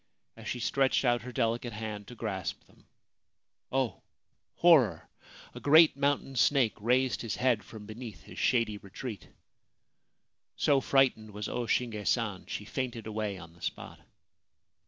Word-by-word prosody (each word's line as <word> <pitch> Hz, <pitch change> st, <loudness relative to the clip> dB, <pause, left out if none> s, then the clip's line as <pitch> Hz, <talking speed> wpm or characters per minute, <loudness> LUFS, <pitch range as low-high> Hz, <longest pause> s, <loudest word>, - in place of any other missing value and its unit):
As -, -, -10 dB
she 125 Hz, -, -3 dB
stretched 135 Hz, +3 st, +2 dB
out 120 Hz, -1 st, +3 dB
her 125 Hz, -, -8 dB
delicate 120 Hz, -1 st, -1 dB
hand 105 Hz, -2 st, -6 dB
to 125 Hz, -, -10 dB
grasp 100 Hz, -5 st, -4 dB
them -, -, -25 dB, 0.4 s
— -, -, -56 dB
oh, 125 Hz, -7 st, -1 dB, 0.5 s
horror! 135 Hz, -, +4 dB, 0.3 s
— -, -, -19 dB
a -, -, -8 dB
great 155 Hz, +1 st, +6 dB
mountain 140 Hz, -1 st, 0 dB
snake 130 Hz, -2 st, +3 dB
raised 125 Hz, +4 st, +1 dB
his 115 Hz, -4 st, -3 dB
head 125 Hz, -5 st, +1 dB
from 105 Hz, +1 st, -11 dB
beneath 110 Hz, -6 st, -9 dB
his -, -, -10 dB
shady 115 Hz, -4 st, +1 dB
retreat. 100 Hz, 0 st, -8 dB, 1.3 s
So 140 Hz, -2 st, +3 dB
frightened 130 Hz, -6 st, +2 dB
was 105 Hz, 0 st, -5 dB
O 120 Hz, -1 st, -3 dB
Shinge 110 Hz, -4 st, -1 dB
San, 105 Hz, -6 st, 0 dB
she 105 Hz, -, -5 dB
fainted 120 Hz, -1 st, -4 dB
away 105 Hz, -2 st, -3 dB
on 80 Hz, -2 st, -12 dB
the 85 Hz, -, -21 dB
spot. -, -, -5 dB
115 Hz, 155 wpm, -30 LUFS, 105-130 Hz, 1.3 s, great